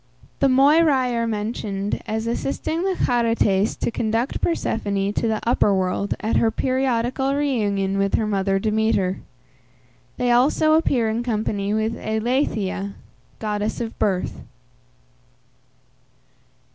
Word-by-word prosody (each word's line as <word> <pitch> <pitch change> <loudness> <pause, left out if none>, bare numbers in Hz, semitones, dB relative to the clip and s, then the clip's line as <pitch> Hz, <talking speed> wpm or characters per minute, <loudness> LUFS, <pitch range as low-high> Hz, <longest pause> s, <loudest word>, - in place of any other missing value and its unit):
The 275 - +4
Moiræ 270 -1 +4
are 230 0 0
mentioned 210 -2 -3
as 220 +1 -2
assisting 275 +7 -2
the 380 0 0
Charites 230 -4 +1
to - - -2
conduct 230 +3 -1
Persephone 205 - -1
to 230 - 0
the 220 -1 0
upper 210 -4 +3
world 190 +2 -1
at 220 0 0
her 225 - +3
periodical 260 +2 0
reunion 205 -9 0
with 195 0 +1
her 220 - +1
mother 195 -2 0
Demeter. 210 -2 0 1.0
They 245 -1 +1
also 285 +5 +3
appear 270 -7 +2
in 220 +2 -1
company 215 -4 -2
with 220 +1 0
Eileithyia, 220 -4 -1 0.4
goddess 210 0 -2
of 230 -2 -4
birth. 190 -3 -1
220 Hz, 120 wpm, -22 LUFS, 205-250 Hz, 1.0 s, The